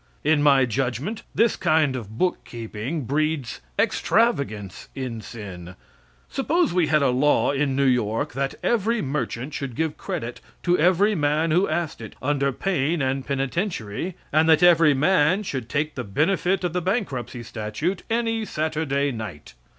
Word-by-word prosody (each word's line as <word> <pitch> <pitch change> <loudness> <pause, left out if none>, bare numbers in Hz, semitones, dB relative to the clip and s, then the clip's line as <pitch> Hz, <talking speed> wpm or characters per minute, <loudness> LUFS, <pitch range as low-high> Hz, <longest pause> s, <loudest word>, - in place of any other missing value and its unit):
In 150 0 +3
my 140 -3 +5
judgment, 130 - -2
this 230 0 +3
kind 155 -4 +2
of 110 -3 -7
bookkeeping 120 -3 -3
breeds 145 -1 -1 0.2
extravagance 135 - 0
in 125 -4 -4
sin. 95 -4 -9 0.5
Suppose 315 - +1
we 175 -3 +2
had 150 -2 +3
a 130 - +3
law 140 +4 +3
in 140 -1 0
New 140 0 +2
York 125 +2 +1
that 135 +1 -2
every 230 0 +1
merchant 135 -1 -3
should 135 -5 -4
give 160 +1 -1
credit 155 -11 -5 0.2
to 175 0 +3
every 185 +5 +3
man 155 -1 +1
who 180 +5 +3
asked 170 -8 -2
it, 110 - -9
under 140 0 +1
pain 165 0 0
and 135 -1 -1
penitentiary, 140 - -2 0.2
and 160 +1 +4
that 160 +2 +5
every 165 -4 +6
man 175 +5 +3
should 130 - -4
take 150 +2 -1
the 125 - -4
benefit 180 - +1
of 175 -2 -1
the 180 - 0
bankruptcy 145 - -2
statute 115 - -3
any 225 -1 0
Saturday 155 -5 -1
night? 105 - -7
145 Hz, 150 wpm, -24 LUFS, 125-175 Hz, 0.5 s, every